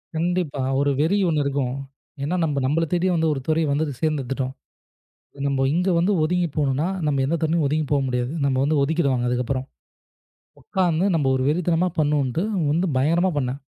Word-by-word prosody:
கண்டிப்பா 170 -4 -1 0.2
ஒரு 140 0 +2
வெறி 165 +7 +2
ஒண்ணு 150 -3 +1
இருக்கும். 135 -2 -1 0.5
ஏன்னா, 155 +6 -1
நாம 145 -4 0
நம்மளைத் 155 +4 0
தேடி 175 +1 +2
வந்து 160 -1 +2
ஒரு 140 - -3
துறையை 160 0 +1
வந்து 150 +3 +1 0.2
தேர்ந்தெடுத்துட்டோம். 135 -4 -1 0.9
நம்ம 135 -1 +1
இங்க 180 +3 +1
வந்து 180 +5 +2
ஒதுங்கிப் 170 -1 0
போகணும்னா, 145 +2 +1 0.2
நம்ம 140 -2 +1
எந்தத் 165 +3 -1
துறையும் 160 0 +1
ஒதுங்கிப் 150 +1 -1
போக 140 -1 +2
முடியாது. 125 +1 -1
நம்ம 135 -2 +1
வந்து 150 +1 +1
ஒதுக்கிடுவாங்க 140 -5 +1
அதுக்கப்புறம். 125 +1 -1 1.0
உக்காந்து 175 -2 0
நம்ம 145 -4 0
ஒரு 130 - -1
வெறித்தனமா 175 +2 +1
பண்ணணும்னுட்டு 145 -1 +1 0.3
வந்து 170 +4 +1
பயங்கரமா 165 +8 +2
பண்ணேன். 130 0 -2
150 Hz, 160 wpm, -23 LUFS, 135-165 Hz, 1.0 s, ஒரு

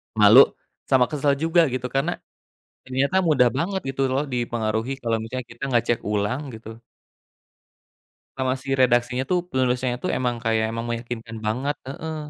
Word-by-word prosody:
Malu 110 +4 +8 0.5
sama 130 -2 +5
kesel 145 -1 +1
juga, 165 +4 +3
gitu, 125 -1 -3
karena 140 +7 0 0.7
ternyata 130 +7 0
mudah 145 -7 +4
banget 190 +5 -1
gitu, 135 0 -2
loh, 135 +3 +1
dipengaruhi 120 -1 -2
kalau 115 -1 0
misalnya 120 +2 -5
kita 120 - -18
nggak 120 -2 +2
cek 120 - +1
ulang, 105 +6 0
gitu 110 0 -10 1.6
Sama 130 -1 0
si 135 +1 -3
redaksinya, 125 0 +2
tuh, 180 -1 +3
penulisnya, 125 -4 0
tuh, - - -2
emang 125 -1 0
kayak 110 -1 +1
emang 115 0 -4
meyakinkan 115 -1 -5
banget, 130 +7 -1
heeh. 160 +4 -5
125 Hz, 150 wpm, -23 LUFS, 115-135 Hz, 1.6 s, Malu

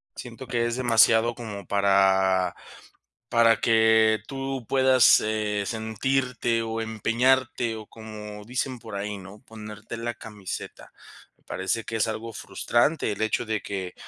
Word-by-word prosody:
Siento 120 +2 -9
que 120 -1 0
es 120 - -2
demasiado, 115 -1 +4
como 110 -5 -8
para 95 -2 +3 0.7
para 115 -2 +4
que 110 -1 +4
tú 135 -2 -4
puedas, 130 -3 +5
eh, 105 -1 -1
sentirte 115 +2 -1
o 115 0 -3
empeñarte, 115 +2 +1
o 110 -1 -8
como 105 -2 -9
dicen 125 +3 -3
por 115 -3 -9
ahí, 100 +1 -4
¿no?, 95 +2 -12
ponerte 105 -3 -9
la 115 +1 -4
camiseta. 105 -4 -8 0.5
Me - - -35
parece 95 +4 -2
que 115 - -5
es 110 0 +1
algo 115 +1 -5
frustrante 120 +8 0
el 100 - -7
hecho 110 +2 0
de 110 -2 -2
que 95 -3 -5
110 Hz, 140 wpm, -25 LUFS, 105-120 Hz, 0.7 s, puedas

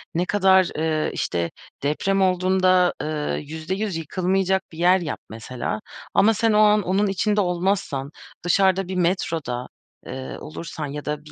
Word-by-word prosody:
ne 175 +2 +1
kadar, 190 -2 +4
eee, 155 0 0
işte 85 -1 -2 0.3
deprem 195 +7 +1
olduğunda, 185 -1 +3
eee, 150 -1 -2
%100 180 +6 -3
yıkılmayacak 185 +4 0
bir 160 - -12
yer 180 +2 +4
yap 165 -4 -4
mesela 110 -1 -4 0.3
ama 220 +3 +5
sen 225 +1 +2
o 210 - +4
an 210 0 +5
onun 195 +3 +1
içinde 205 +2 +1
olmazsan, 180 -6 -1 0.3
dışarıda 190 +1 +3
bir 190 - -4
metroda, 165 -8 -1 0.4
eee, 130 0 -6
olursan 155 0 -6
ya 145 +1 -6
da 150 0 -4
bir 150 - -13
180 Hz, 150 wpm, -23 LUFS, 155-190 Hz, 0.4 s, ama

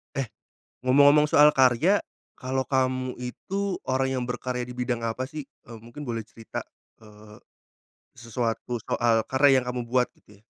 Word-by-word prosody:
Eh, 135 -3 -1 0.6
ngomong-ngomong 145 +3 +6
soal 150 0 +6
karya, 135 - +4 0.4
kalau 130 0 -2
kamu 130 -1 -1
itu 195 +10 -3
orang 130 0 +1
yang 125 - -1
berkarya 125 0 -3
di 125 - -8
bidang 125 -1 -2
apa 115 +3 -2
sih? 150 +2 -7 0.2
E - - -20
mungkin 120 +6 -10
boleh 115 -2 -3
cerita, 115 +1 -8 0.4
eee, 105 0 -15 0.7
sesuatu 115 0 -3
soal 115 0 +1
karya 135 0 +4
yang - - -8
kamu 125 0 -3
buat 125 0 +2
gitu 105 -1 -21
ya. - - -29
125 Hz, 155 wpm, -26 LUFS, 115-135 Hz, 0.7 s, ngomong-ngomong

